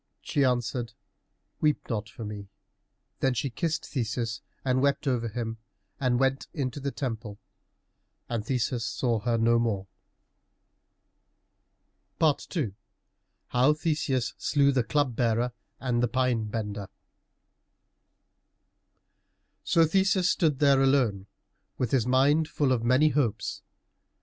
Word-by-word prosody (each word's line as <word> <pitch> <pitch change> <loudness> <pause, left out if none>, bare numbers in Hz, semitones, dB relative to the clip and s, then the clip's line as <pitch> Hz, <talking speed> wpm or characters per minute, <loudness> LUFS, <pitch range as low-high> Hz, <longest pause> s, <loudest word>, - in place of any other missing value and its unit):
She 145 - +1
answered, 120 -2 0 0.7
"Weep 150 -2 +1
not 110 -2 -3
for 115 0 -8
me." 105 -1 -7 0.7
Then 130 -1 +1
she 125 +2 -1
kissed 165 +6 -2
Theseus 115 -3 -3 0.2
and 130 0 +2
wept 140 +1 +1
over 120 -3 +1
him, 115 0 -4 0.4
and 125 -3 +1
went 135 0 +1
into 135 -2 -2
the 140 0 -2
temple, 115 -6 -5 0.9
and 115 -3 -2
Theseus 125 0 -1
saw 120 -3 0
her 115 +2 0
no 115 +1 +3
more. 105 -5 -1 2.3
II 150 - +1 0.8
HOW 130 +4 +4
THESEUS 150 -5 -1
SLEW 140 -1 +3
THE 130 -3 +2
CLUB 145 -1 0
BEARER 120 +1 +1 0.3
AND 120 -2 0
THE 120 - +3
PINE 125 -2 +1
BENDER 105 -2 -4 2.8
So 165 -1 +4
Theseus 190 +2 +2
stood 155 -6 +1
there 140 -1 +4
alone, 125 -8 +2 0.5
with 125 -4 -1
his 125 -4 +2
mind 140 +5 +3
full 145 -4 0
of 120 -3 +1
many 130 +6 +4
hopes. 120 -6 -1
125 Hz, 120 wpm, -28 LUFS, 115-140 Hz, 2.8 s, HOW